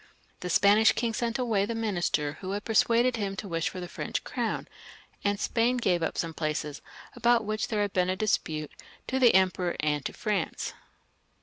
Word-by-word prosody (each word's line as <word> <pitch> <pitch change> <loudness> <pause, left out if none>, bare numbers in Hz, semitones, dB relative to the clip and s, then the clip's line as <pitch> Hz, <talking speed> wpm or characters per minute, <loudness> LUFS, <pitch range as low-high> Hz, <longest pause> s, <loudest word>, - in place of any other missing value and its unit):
The 180 - -5
Spanish 205 +5 +5
king 230 0 -1
sent 235 +2 -1
away 230 -6 +1
the 230 +3 -2
minister 175 -9 -1
who 190 0 -4
had 205 +1 -4
persuaded 235 +2 +3
him 200 -2 -2
to 200 - -6
wish 165 -2 -1
for 185 - -7
the 180 - -5
French - - -4
crown, - - -3 0.6
and 200 0 +1
Spain 240 +3 +1
gave 180 -8 +1
up 160 - -2
some 165 -1 -2
places 150 -2 -3 0.3
about 235 -2 +3
which 215 +1 -1
there 210 -3 0
had 205 - -3
been 180 -1 +2
a 185 - 0
disptttejxtq^ 155 -7 -1 0.4
the 260 -4 +4
Emperor 185 -2 +2
and 150 -2 0
to - - -3
France. 205 -6 -2
200 Hz, 185 wpm, -28 LUFS, 175-225 Hz, 0.6 s, Spanish